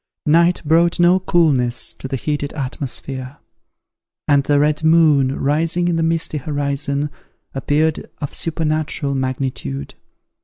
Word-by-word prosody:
Night 170 +3 +3
brought 165 +3 +3
no 175 +2 +5
coolness 140 -10 +1
to - - -8
the 135 - -3
heated 145 +2 -3
atmosphere; 135 -1 -5 0.9
and 140 -1 +4
the 145 - +3
red 150 +2 +1
moon 155 -5 +4
rising 165 +5 +1
in 175 - +1
the 165 - 0
misty 165 -2 0
horizon, 145 0 -2 0.4
appeared 150 +3 0
of 145 - -5
supernatural 155 -3 -2
magnitude. 130 - -3
150 Hz, 120 wpm, -19 LUFS, 135-160 Hz, 0.9 s, no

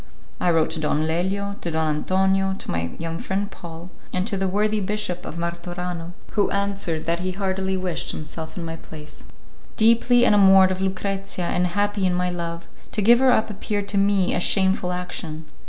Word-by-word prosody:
I 180 - +2
wrote 165 -2 +2
to 160 - -3
Don 155 0 +1
Lelio, 195 +5 -1
to 170 - -3
Don 160 -2 0
Antonio, 190 +3 +1
to - - -6
my 85 0 -1
young 165 0 -4
friend 200 +1 -2
Paul, 170 +1 -9 0.2
and 185 0 0
to 220 - -1
the 195 0 0
worthy 210 +3 +1
Bishop 195 -3 -3
of 170 - -6
Martorano, 175 0 -4 0.2
who 205 -2 +2
answered 200 -5 -1
that 170 +1 0
he 185 +1 -2
heartily 190 0 -1
wished 185 -2 -3
himself 160 +2 -7
in 170 - -4
my 165 0 -5
place. 150 -2 -11 0.5
Deeply 235 +2 +5
enamoured 195 -3 +6
of 185 0 -2
Lucrezia 195 -1 -2
and 180 +1 +1
happy 205 +1 0
in 180 - +1
my 180 0 0
love, 170 -1 -5 0.3
to 210 - 0
give 235 +3 +7
her 265 -1 +5
up 220 -3 +2
appeared 205 0 -3
to 200 - +1
me 195 -2 +2
a - - +1
shameful 190 0 +2
action. 175 -3 -5
185 Hz, 190 wpm, -23 LUFS, 170-200 Hz, 0.5 s, give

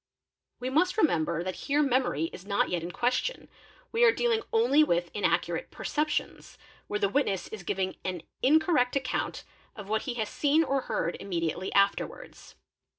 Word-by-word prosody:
We 255 +1 -3
must 360 +8 +2
remember 170 - +2
that 185 0 -4
here 290 +2 +3
memory 250 - +1
is 180 - -9
not 200 0 0
yet 175 -2 -1
in 170 - -5
question, 250 - -1 0.4
we 460 +1 +2
are 470 - +8
dealing 460 -1 +1
only 250 +7 +4
with 175 - 0
inaccurate 210 - 0
perceptions, 300 0 -3
_ - - -29 0.3
where 210 - -1
the 200 - +2
witness 200 -4 0
is 220 - -7
giving 190 +1 -2
an 180 -3 -4 0.2
incorrect 295 -2 +3
account 265 -2 -2 0.3
of 205 -2 -9
what 220 0 +1
he 240 - -2
has 220 -3 -1
seen 300 +6 +2
or 275 -3 0
heard 170 - -1
immediately 175 -1 -2
afterwards. 200 0 -1
235 Hz, 165 wpm, -28 LUFS, 185-295 Hz, 0.4 s, are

